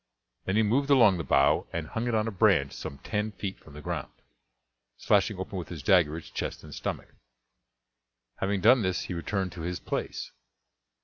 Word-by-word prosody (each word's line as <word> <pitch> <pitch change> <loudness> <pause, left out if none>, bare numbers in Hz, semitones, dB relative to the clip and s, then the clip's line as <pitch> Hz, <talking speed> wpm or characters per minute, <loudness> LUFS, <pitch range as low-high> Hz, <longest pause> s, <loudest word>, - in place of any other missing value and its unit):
Then 95 - 0
he 110 - +4
moved 135 +7 +1
along 115 -10 +6
the - - -2
bough 70 -2 +3
and 85 -2 -3
hung 115 +6 -2
it 120 - +1
on 110 0 +1
a - - -2
branch 95 - +3
some 70 - -7
ten 105 0 -2
feet 95 -1 -5
from 75 - -16
the 75 - -9
ground, - - -4 0.9
slashing 100 0 +2
open 95 +1 -4
with 85 - -7
his 80 -5 -7
dagger 80 -3 +4
its 85 - -10
chest - - -4
and - - -10
stomach. - - -5 1.2
Having 100 0 -1
done 120 +4 +6
this 95 -2 0
he - - -5
returned 95 +2 -2
to 85 - -8
his 90 +2 -3
place. - - -4
95 Hz, 190 wpm, -28 LUFS, 85-110 Hz, 1.2 s, along